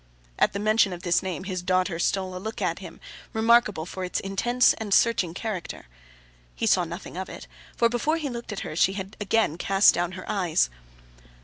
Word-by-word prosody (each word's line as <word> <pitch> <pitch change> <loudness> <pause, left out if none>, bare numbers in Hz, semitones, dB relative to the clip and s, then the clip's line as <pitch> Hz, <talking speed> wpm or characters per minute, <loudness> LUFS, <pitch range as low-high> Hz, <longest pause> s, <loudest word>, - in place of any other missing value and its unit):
At - - +3
the - - -2
mention 215 -2 +3
of 175 - -9
this 175 -1 +2
name, 185 -1 -4
his 185 -2 -4
daughter 185 -1 0
stole 185 +1 -1
a - - -4
look 220 +2 -5
at 180 -3 -1
him, 175 -4 -10 0.3
remarkable 220 -6 +3
for 185 +1 -6
its 180 - -2
intense 240 +6 +2
and 215 -2 -5
searching 185 -8 +2
character. 205 - -5 0.7
He - - -2
saw - - +3
nothing - - -8
of - - -4
it, - - -9 0.3
for 235 - +4
before 245 +7 0
he 310 -3 -3
looked 235 -3 -6
at 210 - -4
her, 155 - -6
she 190 +3 +3
had 195 +1 -6
again 205 -5 +1
cast 195 +2 +5
down 175 +1 -1
her 185 - -8
eyes! 175 - +1
195 Hz, 200 wpm, -26 LUFS, 180-220 Hz, 0.7 s, cast